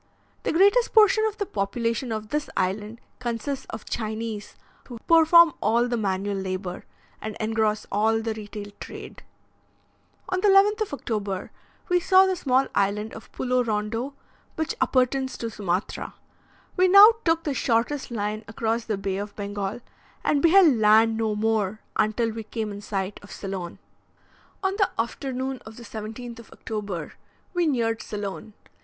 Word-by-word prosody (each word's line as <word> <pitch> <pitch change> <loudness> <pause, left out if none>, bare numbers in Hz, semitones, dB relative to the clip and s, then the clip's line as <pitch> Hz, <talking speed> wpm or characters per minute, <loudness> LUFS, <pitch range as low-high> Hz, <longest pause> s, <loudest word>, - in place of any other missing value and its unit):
The - - -1
greatest 405 +8 +4
portion 435 0 +6
of 435 -1 -2
the 405 - -1
population 230 - -2
of 215 -1 -4
this 300 0 -2
island 210 +4 -2 0.2
consists 250 +3 -3
of 220 - -7
Chinese, 220 -1 -4 0.3
who 245 - -8
perform 330 0 +7
all 235 +3 +2
the 240 - -1
manual 200 -2 -1
labour, 185 -1 -4 0.4
and 215 -1 -5
engross 220 -1 0
all 220 +2 +2
the 225 0 -2
retail 210 -1 -8
trade. - - -9 1.1
On 365 - 0
the 415 - +3
11th 405 +2 +5
of 425 - -2
October 205 -7 -4 0.4
we 360 0 +3
saw 375 +2 +6
the 380 -1 +1
small 265 -5 +2
island 205 +2 0
of 220 - -11
Pulo 250 0 0
Rondo, 225 +4 -2 0.4
which 315 -1 -2
appertains 260 +1 +1
to 230 -1 -4
Sumatra. 190 -2 -3 0.6
We 370 0 +4
now 400 +4 +10
took 330 -1 +2
the 290 - -1
shortest 245 +3 0
line 215 -1 -3
across 225 +1 -2
the 215 -3 -2
Bay 195 -1 -2
of 205 +1 -6
Bengal, 205 +1 -4 0.4
and 285 - +2
beheld 335 -5 +6
land 220 +1 +5
no 220 -1 0
more 215 -1 0 0.2
until 220 +2 +1
we 225 +1 -5
came 220 0 -4
in 205 0 -7
sight 195 -1 -3
of 205 - -14
Ceylon. 190 -3 -6 0.9
On 385 0 +1
the 395 -3 +3
afternoon 260 +2 -3
of 220 0 -12
the 240 - -10
17th 225 +2 -7
of 230 - -13
October, 200 -8 -5 0.4
we 350 -2 +1
neared 230 -5 0
Ceylon. 205 +1 -6
225 Hz, 155 wpm, -25 LUFS, 210-275 Hz, 1.1 s, now